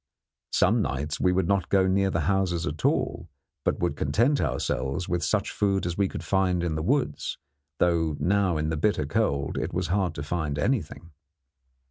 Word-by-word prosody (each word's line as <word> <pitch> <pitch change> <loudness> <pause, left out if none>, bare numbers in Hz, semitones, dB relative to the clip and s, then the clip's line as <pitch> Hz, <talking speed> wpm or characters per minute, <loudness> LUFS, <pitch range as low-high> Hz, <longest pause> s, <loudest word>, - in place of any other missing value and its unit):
Some - - +3
nights 75 +2 -2
we 90 - +3
would 90 -1 +1
not 100 -1 +1
go 95 -1 +4
near 95 +1 +2
the 85 -3 0
houses 90 -1 0
at 75 +2 -5
all, 80 - 0 0.3
but - - +1
would - - -1
content 115 - +2
ourselves 70 +2 -1
with 90 -2 -1
such - - 0
food 100 -2 0
as 85 -1 -2
we 100 0 +2
could - - -6
find 95 -2 +1
in 85 -2 -1
the 80 - -2
woods, 135 - -1 0.4
though 80 -4 +1
now 90 +2 +2
in 75 0 -1
the 80 - -1
bitter 80 -2 +1
cold 70 -4 0
it - - -3
was 90 -2 -1
hard 95 -3 0
to 70 - -4
find 75 -2 -2
anything. 85 - -2
85 Hz, 185 wpm, -26 LUFS, 75-95 Hz, 0.4 s, go